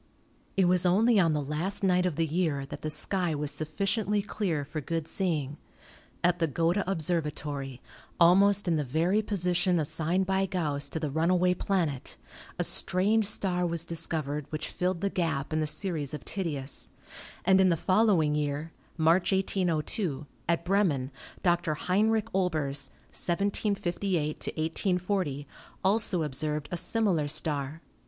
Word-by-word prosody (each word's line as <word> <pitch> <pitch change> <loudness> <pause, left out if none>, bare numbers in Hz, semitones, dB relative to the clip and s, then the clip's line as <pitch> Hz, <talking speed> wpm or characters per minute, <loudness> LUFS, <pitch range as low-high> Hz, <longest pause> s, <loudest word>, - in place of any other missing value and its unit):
It 190 - +4
was 180 0 +3
only 210 +5 +4
on 165 -4 +3
the 150 -1 -1
last 165 +9 0
night 180 -1 +3
of 175 - -3
the 165 +1 +1
year 155 -4 -1
that - - -8
the 155 - -3
sky 175 +1 +2
was 145 0 -2
sufficiently 195 +7 -1
clear 185 -9 -2
for 155 +2 -5
good 165 +2 -3
seeing. 155 -8 -2 0.7
At 175 0 +2
the 165 - +2
Gotha 170 +6 +1
Observatory, 150 -6 -2 0.4
almost 195 +3 +5
in 165 -2 +2
the 150 - 0
218 130 - -11
ASTRONOMY 160 +5 +1
very 200 +4 +3
position 180 -3 +1
assigned 165 +5 0
by 190 +1 +1
Ganss 150 -6 -2
to 160 - -3
the 150 -3 -3
runaway 180 +4 +2
planet, 170 -9 -2 0.4
a - - 0
strange 205 +4 +3
star 185 -4 0
was 170 -1 -1
discovered, 155 -3 -2
which 155 - -4
filled 180 -1 -2
the 200 - +1
gap 160 -6 -2
in 155 - +1
the 155 - 0
series 155 -4 0
of - - -10
Titius, 150 -8 -3 0.6
and 190 +1 +5
in 190 - +5
the 170 - +2
following 185 -5 +3
year 150 +2 -2 0.3
(March, 165 +4 +3
1802), 180 -5 0 0.2
at 170 0 +1
Bremen, 170 -9 +1 0.3
Dr. 175 -3 +1
Heinrich 215 +6 +1
Olbers 150 -7 0 0.2
(1758 185 -3 -1
1840) 170 -2 -1 0.4
also 190 -3 +2
observed 150 +1 -2
a - - -1
similar 185 -7 +1
star. 150 0 0
170 Hz, 150 wpm, -28 LUFS, 150-190 Hz, 0.7 s, almost